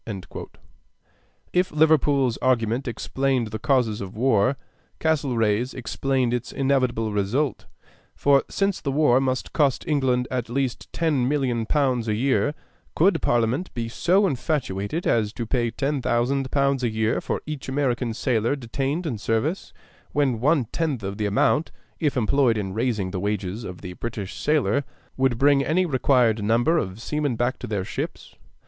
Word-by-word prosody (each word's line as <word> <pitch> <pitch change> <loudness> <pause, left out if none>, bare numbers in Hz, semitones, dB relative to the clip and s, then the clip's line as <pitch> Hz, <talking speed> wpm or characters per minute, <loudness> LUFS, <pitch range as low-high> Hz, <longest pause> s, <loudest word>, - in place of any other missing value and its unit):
If 180 +1 +2
Liverpool's 145 -5 +3
argument 125 0 +1
explained 130 0 -1
the 110 - -4
causes 120 -5 +1
of 95 -1 -7
war, 125 +1 +2 0.4
Castlereagh's 125 -7 +1
explained 130 +1 -1
its 125 0 -3
inevitable 130 -5 +1
result; 115 +8 -1 0.5
for 140 -1 +4
since 195 -1 0
the 140 - -2
war 135 -3 +4
must 130 -1 -2
cost 140 -5 +1
England 130 -4 +1
at 125 -2 -2
least 130 0 -2
10,000,000 135 -6 0
pounds 130 -6 +1
a 105 - +1
year, 135 +5 +1 0.4
could 190 +5 +3
Parliament 120 +9 +1
be 115 -1 -2
so 180 - +2
infatuated 135 - -2
as 110 -3 +2
to 115 - -4
pay 120 +1 0
10,000 135 0 0
pounds 140 -1 +1
a 120 - +2
year 110 +1 0
for - - -2
each 150 -3 -6
American 130 -3 0
sailor 120 +1 +1
detained 140 +6 -3
in 120 -9 -3
service, 115 - -1 0.4
when 135 -6 +1
one 140 +1 +2
tenth 150 -9 -2
of 100 +2 -5
the 105 - +1
amount, 145 +9 +2 0.3
if 150 -4 0
employed 120 0 +2
in 95 -3 -3
raising 110 -4 -1
the 95 - -3
wages 100 +2 -2
of 90 -3 -8
the 90 - -7
British 105 -1 -6
sailor, 145 -1 +1 0.3
would 130 -3 +1
bring 140 +1 +4
any 170 +6 +2
required 125 -7 +2
number 120 +10 +3
of 95 -3 -4
seamen 145 +1 -1
back 120 +3 -1
to - - -6
their 100 -3 -2
ships? - - -5
130 Hz, 150 wpm, -24 LUFS, 115-140 Hz, 0.5 s, for